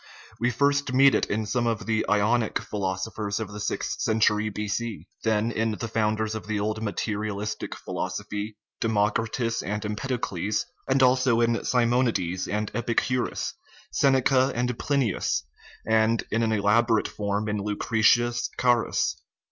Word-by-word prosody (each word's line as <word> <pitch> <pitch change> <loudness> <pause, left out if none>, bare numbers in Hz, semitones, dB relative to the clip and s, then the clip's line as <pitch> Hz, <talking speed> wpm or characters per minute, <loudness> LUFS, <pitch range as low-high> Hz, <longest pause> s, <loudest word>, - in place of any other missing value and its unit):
We 120 +2 +2
first 140 +1 +1
meet 135 +1 +6
it - - +1
in 110 +1 -1
some 120 +3 0
of 115 -2 -1
the 110 -1 +1
Ionic 105 +2 +2
phi - - -8
losophers 100 +2 -2
of 110 -2 -5
the 105 - -7
sixth - - -2
century 110 -1 +2
B.C., 105 -3 -3 0.2
then 110 +1 +1
in 115 -1 0
the 115 +2 -4
founders 110 0 0
of 110 -1 -6
the 110 -1 -1
old 110 +1 -2
materialistic 105 -1 -3
philosophy, 105 +1 -4 0.2
Democritus 115 +2 0
and 105 +3 -3
Empedocles, 105 -3 -2 0.2
and 135 0 +3
also 130 -2 +4
in 115 0 +1
Simonides 115 -7 +1
and 105 0 -2
Epicurus, 120 +1 -1 0.4
Sen 135 -1 +3
eca 130 0 +3
and 125 0 0
Plinius, 135 - 0 0.4
and 110 +1 +3
in 115 - +1
an 115 -1 +1
elaborate 110 +2 +3
form 105 +1 -2
in 105 0 -1
Lucretius 115 +3 +2
Carus. 120 -2 +1
110 Hz, 140 wpm, -26 LUFS, 105-120 Hz, 0.4 s, meet